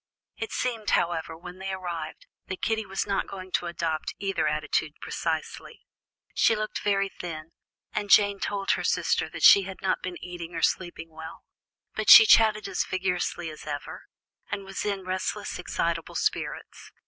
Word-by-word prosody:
It 450 - -5
seemed, 230 -5 -2
however, 165 -1 0
when 180 +2 -10
they 195 0 -4
arrived, 175 -4 -5 0.2
that 190 - -6
Kitty 220 -2 0
was 195 0 -2
not 200 - -1
going 185 -1 -8
to 175 - 0
adopt 165 -2 -3
either 195 -5 -1
attitude 150 0 -1
precisely. 160 -2 -4 0.5
She 225 - +4
looked 215 0 -3
very 195 -1 +1
thin, 160 -3 -8 0.4
and 205 -1 -2
Jane 200 -1 +5
told 200 -1 -1
her - - 0
sister - - +1
that - - -7
she 200 - +9
had 190 -1 -8
not 190 - 0
been 180 -1 -5
eating 175 -1 -8
or 165 - -3
sleeping 175 -2 -1
well, 160 0 -10 0.5
but - - -1
she 465 - +12
chatted 215 - +5
as 195 - 0
vigorously 180 -3 -2
as 155 - -12
ever, 145 -1 -6 0.4
and 200 - -4
was 195 0 -5
in 200 -2 -2
restless, 185 0 -3
excitable - - -2
spirits. - - -3
185 Hz, 165 wpm, -27 LUFS, 165-200 Hz, 0.5 s, she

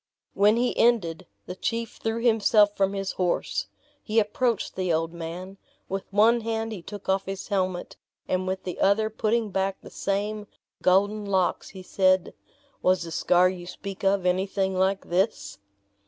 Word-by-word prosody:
When 205 +2 +4
he 245 +1 0
ended, 185 -7 +2 0.2
the 180 - -6
chief 230 +3 -3
threw 225 +1 -2
himself 215 -3 +4
from 195 0 +1
his 195 -1 -2
horse. 180 -2 -1 0.3
He 215 0 -3
approached 225 +1 0
the 185 -2 -1
old 165 +1 0
man; 175 +4 -7 0.3
with 195 +1 -5
one 225 +4 +4
hand 225 0 -2
he 205 -5 -6
took 205 +3 -9
off 190 0 +1
his 195 0 -5
helmet, 185 -3 -2 0.3
and 185 0 -1
with 190 0 -3
the 180 - -5
other 215 +2 +3
putting 220 0 0
back 195 0 -1
the - - -12
same 205 +1 -2 0.3
golden 205 +3 +3
locks, 190 -2 0
he 190 -1 -10
said, 185 -1 +2 0.5
"Was 185 -1 +2
the 165 - -7
scar 180 +2 +4
you 180 -1 -5
speak 195 +1 -8
of 195 -1 +2
anything 190 +1 0
like 190 +1 +1
this?" 175 - -1
195 Hz, 165 wpm, -26 LUFS, 185-215 Hz, 0.5 s, When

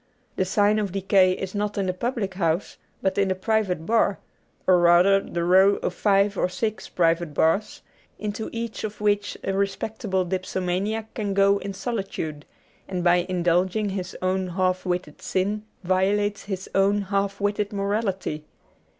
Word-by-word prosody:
The 185 - +1
sign 205 +2 +3
of 205 -3 -2
decay 190 -1 +4
is 190 0 -5
not 205 0 -2
in 195 - 0
the 185 - 0
public 215 -1 -2
house, 170 -1 -1 0.3
but 190 +1 +1
in 195 - +3
the 185 - 0
private 185 -4 0
bar; 220 -2 +2 0.5
or 185 -1 +5
rather 175 +3 +5
the 170 -3 -4
row 190 +3 +5
of - - -3
five 200 +1 +2
or 180 - +2
six 215 +3 -3
private 165 -3 +1
bars, 165 +7 +1 0.3
into 210 +1 -4
each 230 -1 -5
of 215 -1 -5
which 205 -1 0
a 195 - -1
respectable 195 0 -1
dipso 185 +1 -3
maniac 200 +5 -2
can 205 -3 -2
go 200 0 +4
in 195 -1 -6
solitude, 190 -10 -4 0.4
and 180 -2 -3
by 175 0 +3
indulging 185 +4 +1
his 190 -1 -5
own 185 0 0
half 185 +1 -1
witted 180 -4 -3
sin 205 +3 -1 0.2
violates 200 +3 +1
his 190 -2 -5
own 200 +1 +3
half 200 0 -1
witted 205 0 -1
morality. 200 -6 -2
195 Hz, 160 wpm, -24 LUFS, 185-205 Hz, 0.5 s, or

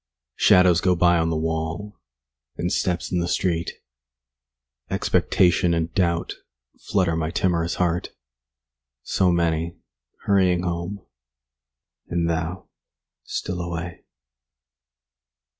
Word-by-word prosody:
Shadows 90 -2 +5
go 90 -1 +3
by 85 0 +4
on 80 0 +1
the 80 - 0
wall, 80 +5 -3 0.6
And 90 - -1
steps 90 -1 -1
in 90 - +1
the 85 - -1
street. 85 -2 0 1.2
Expectation 90 -2 +2
and 85 0 -2
doubt 85 -3 0 0.4
5 - - -32
Flutter 90 -4 +2
my 80 -1 -1
timorous 85 -1 0
heart. 90 -1 0 0.9
So 95 -2 +2
many 85 -1 0 0.5
hurrying 90 -3 +3
home— 85 +3 -4 1.0
And 85 -1 0
thou 85 +3 -3 0.6
still 90 -1 -3
away. 85 0 -5
85 Hz, 105 wpm, -23 LUFS, 85-90 Hz, 1.2 s, Shadows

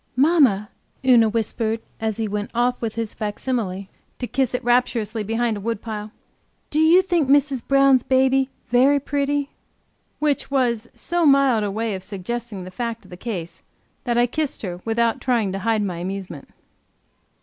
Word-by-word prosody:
"Mamma," 260 - +3 0.4
Una 235 -4 +6
whispered, 225 0 -1 0.2
as 220 -2 -2
he 225 -1 -1
went 205 0 -3
off 245 +1 +1
his 225 -1 -3
facsimile, 210 -3 -3 0.3
to 250 - -3
kiss 255 0 0
it - - -3
rapturously, 235 -3 +1
behind 225 +2 0
a - - -7
woodpile, 215 -1 -4 0.6
"do 300 - +1
you 335 +4 +6
think 340 -7 +1
Mrs. 280 -2 +3
Brown's 275 -2 +4
baby 265 +1 +2 0.2
very 265 +4 +4
pretty?" 285 0 -1 0.7
Which 295 -2 0
was 240 -4 0
so 345 -1 -1
mild 275 -5 +4
a 205 - -1
way 220 +2 -2
of 190 - -5
suggesting 205 +1 -5
the 185 - -9
fact 230 +1 -4
of 185 - -17
the - - -7
case, 175 -5 -6 0.4
that 240 -1 0
I 240 - +5
kissed 290 +2 -3
her 180 -2 -5
without 230 0 +1
trying 235 -6 +1
to 195 - -3
hide 220 0 +1
my 180 -4 -3
amusement. 180 -4 -6
235 Hz, 160 wpm, -22 LUFS, 210-265 Hz, 0.7 s, Una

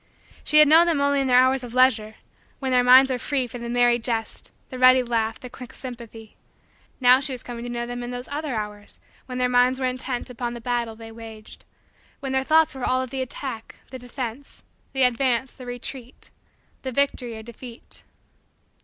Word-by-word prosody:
She 305 - +3
had 305 0 +9
known 325 +3 +6
them 325 -4 +1
only 280 0 +2
in 270 - -1
their 250 -1 +5
hours 260 +1 +4
of 245 0 -8
leisure 225 -4 +3 0.4
when 265 -2 -3
their 250 -1 +4
minds 260 +2 +7
were 250 - -1
free 270 0 -1
for 245 0 -8
the 235 0 -6
merry 240 0 +3
jest, 225 -1 -3 0.2
the 255 - -6
ready 255 0 +6
laugh, 225 -2 -1
the 250 - -9
quick 250 0 -11
sympathy: 235 -4 -10 0.6
now 250 0 +6
she 275 -1 -2
was 250 - -8
coming 240 -1 -7
to - - -5
know 240 0 -3
them 245 0 -5
in 240 - -5
those 245 0 -6
other 290 -2 -3
hours 210 -1 -6 0.3
when 250 -1 -5
their 250 0 +2
minds 250 +1 +3
were 260 - -1
intent 255 0 -3
upon 240 0 -4
the - - -7
battle 235 -1 -2
they 225 0 -11
waged 225 -1 -12 0.5
when 270 - -4
their 265 0 +1
thoughts 315 +3 +3
were 265 -2 -8
all 255 +1 +1
of 255 - -8
the 265 -1 -3
attack, 255 -2 -6 0.2
the 260 - -7
defense, 250 +1 -7 0.3
the 265 -1 +2
advance, 250 0 +1
the 255 -2 -12
retreat, 245 +1 -7 0.5
the 260 - -4
victory 250 -3 -1
or 220 - -9
defeat. 235 +1 -10
250 Hz, 205 wpm, -24 LUFS, 235-265 Hz, 0.6 s, had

